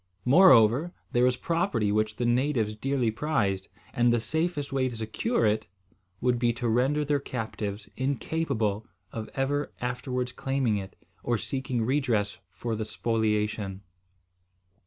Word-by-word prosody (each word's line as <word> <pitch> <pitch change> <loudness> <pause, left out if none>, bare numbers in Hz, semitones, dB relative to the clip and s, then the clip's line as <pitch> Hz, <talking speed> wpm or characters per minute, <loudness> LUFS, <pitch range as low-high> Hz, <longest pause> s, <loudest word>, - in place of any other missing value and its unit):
Moreover, 140 - +6 0.2
there 120 +1 +3
was 125 0 +2
property 165 - 0
which 110 0 +1
the 120 - -1
natives 120 -3 +1
dearly 130 0 0
prized; 105 -8 -1 0.3
and 120 0 +3
the 120 - +3
safest 150 +4 -2
way 130 -1 +1
to 120 - -7
secure 115 - 0
it 110 +1 +1 0.5
would 125 -1 +1
be 120 -1 +3
to 120 0 -3
render 135 +6 +2
their 145 0 +1
captives 110 -5 -5
incapable 130 -5 -1 0.2
of 110 -1 -5
ever 145 +2 0
afterwards 125 0 -2
claiming 135 -5 0
it, 95 -1 -7 0.3
or 120 -1 0
seeking 130 -1 -2
redress 115 -6 0
for 115 -2 -4
the 110 - -2
spoliation. 105 -2 -1
120 Hz, 135 wpm, -28 LUFS, 110-135 Hz, 0.5 s, Moreover